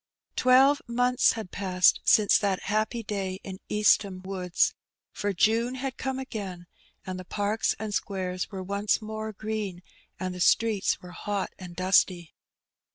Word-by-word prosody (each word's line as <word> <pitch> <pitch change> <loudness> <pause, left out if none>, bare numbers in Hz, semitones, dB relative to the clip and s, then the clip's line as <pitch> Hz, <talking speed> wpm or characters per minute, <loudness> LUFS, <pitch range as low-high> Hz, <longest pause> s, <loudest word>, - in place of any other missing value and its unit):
Twelve 265 +3 +5
months 245 +1 +3
had 220 -5 -7
passed 185 -2 +3
since 210 -2 +5
that 195 -3 -1
happy 215 +3 -1
day 195 -2 -3
in 190 -1 -7
East 210 0 +4
ham 190 -2 -8
Woods, 185 -2 0 0.4
for 205 - -2
June 230 +6 +2
had 260 0 -4
come 265 0 -3
again; 200 -9 -6 0.4
and 185 0 -5
the - - -7
parks 205 +4 -1
and 215 -1 -5
squares 185 -3 -2
were 190 -2 -6
once 200 +2 0
more 220 0 -5
green, 210 -4 -4 0.4
and 185 -1 -3
the 180 - -8
streets 210 +2 +2
were 180 - -10
hot 200 +2 -3
and 180 -2 -9
dusty. 185 -2 +2
200 Hz, 155 wpm, -27 LUFS, 185-220 Hz, 0.4 s, Twelve